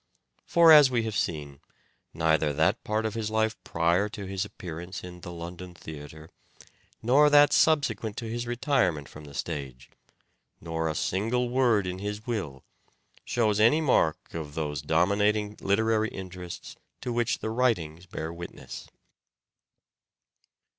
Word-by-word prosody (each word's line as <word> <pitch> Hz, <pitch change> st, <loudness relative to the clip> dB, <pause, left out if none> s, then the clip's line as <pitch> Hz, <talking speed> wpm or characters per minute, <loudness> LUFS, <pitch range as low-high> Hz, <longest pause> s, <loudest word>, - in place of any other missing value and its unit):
For 170 Hz, -1 st, +6 dB
as 150 Hz, -3 st, +9 dB
we 120 Hz, -3 st, 0 dB
have 110 Hz, -2 st, -3 dB
seen, 75 Hz, -6 st, -3 dB, 0.5 s
neither 80 Hz, -2 st, +2 dB
that 95 Hz, -, +1 dB
part 110 Hz, +1 st, -1 dB
of 110 Hz, -, -1 dB
his 110 Hz, -2 st, -3 dB
life 110 Hz, 0 st, +1 dB
prior 85 Hz, +5 st, +1 dB
to 100 Hz, -1 st, -7 dB
his 95 Hz, 0 st, -2 dB
appearance 90 Hz, +2 st, -8 dB
in 90 Hz, -1 st, -9 dB
the 90 Hz, -, -8 dB
London 85 Hz, +1 st, -8 dB
theatre, 80 Hz, 0 st, -10 dB, 0.7 s
nor 140 Hz, +6 st, +5 dB
that 145 Hz, 0 st, +6 dB
subsequent 140 Hz, -9 st, +2 dB
to 115 Hz, -, -4 dB
his 120 Hz, +1 st, -4 dB
retirement 120 Hz, -, 0 dB
from 75 Hz, 0 st, -12 dB
the 70 Hz, -1 st, -12 dB
stage, 65 Hz, -5 st, -5 dB, 0.7 s
nor 80 Hz, -1 st, -2 dB
a 75 Hz, -, -3 dB
single 115 Hz, +10 st, 0 dB
word 120 Hz, -5 st, +3 dB
in 90 Hz, 0 st, -4 dB
his 105 Hz, +2 st, -5 dB
will, 90 Hz, -, -4 dB, 0.6 s
shows 110 Hz, -3 st, +1 dB
any 115 Hz, +8 st, +5 dB
mark 130 Hz, -, +1 dB
of 75 Hz, -3 st, -6 dB
those 75 Hz, -4 st, -2 dB
dominating 105 Hz, +7 st, +1 dB
literary 110 Hz, +2 st, +2 dB
interests 90 Hz, -2 st, -8 dB, 0.3 s
to 125 Hz, -, -3 dB
which 120 Hz, -1 st, +1 dB
the 110 Hz, -, -4 dB
writings 95 Hz, -9 st, 0 dB
bear 80 Hz, 0 st, -5 dB
witness. 85 Hz, +1 st, -9 dB
95 Hz, 140 wpm, -27 LUFS, 80-115 Hz, 0.7 s, as